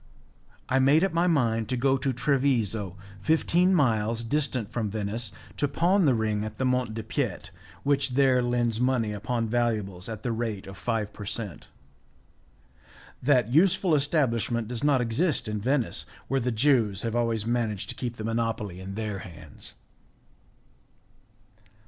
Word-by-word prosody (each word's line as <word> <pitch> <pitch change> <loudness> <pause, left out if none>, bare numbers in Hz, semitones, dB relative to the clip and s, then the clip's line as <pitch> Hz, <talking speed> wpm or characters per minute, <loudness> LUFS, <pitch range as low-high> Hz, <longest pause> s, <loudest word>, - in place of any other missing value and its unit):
I 130 - +2
made 140 +5 +5
up 195 -3 +1
my 170 +2 +2
mind 115 -9 +1
to 130 - 0
go 135 +2 +3
to 135 0 0
Treviso, 120 -7 0 0.2
fifteen 170 - +3
miles 115 -6 +1
distant 130 -4 -1
from 110 -3 -2
Venice, 110 +2 -3 0.3
to 145 - +2
pawn 175 +6 +2
the 135 -4 +4
ring 110 -2 0
at 110 0 -6
the 130 - 0
Mont 125 -3 0
de 110 - -4
piete, 110 - -3 0.3
which 140 -2 +1
there 130 -2 +4
lends 120 -2 0
money 125 -4 +1
upon 115 +3 -2
valuables 110 -5 -1
at 110 -2 -6
the 120 - -1
rate 110 -3 -3
of 95 - -9
five 105 +1 -2
per 105 - -8
cent. 100 -4 -4 1.5
That 125 -3 +2
useful 175 +2 +4
establishment 125 -6 +1
does 120 +1 -4
not 140 -3 +3
exist 125 +5 +1
in 105 -1 -3
Venice, 130 +1 -1 0.2
where 135 - +1
the 125 +1 -1
Jews 110 -5 +2
have 115 0 -2
always 115 -3 0
managed 115 -4 -1
to - - -5
keep 120 -2 -4
the 110 - -5
monopoly 115 -4 -2
in 95 +1 -7
their 105 -2 -3
hands. 80 - -12
115 Hz, 155 wpm, -27 LUFS, 110-135 Hz, 1.5 s, made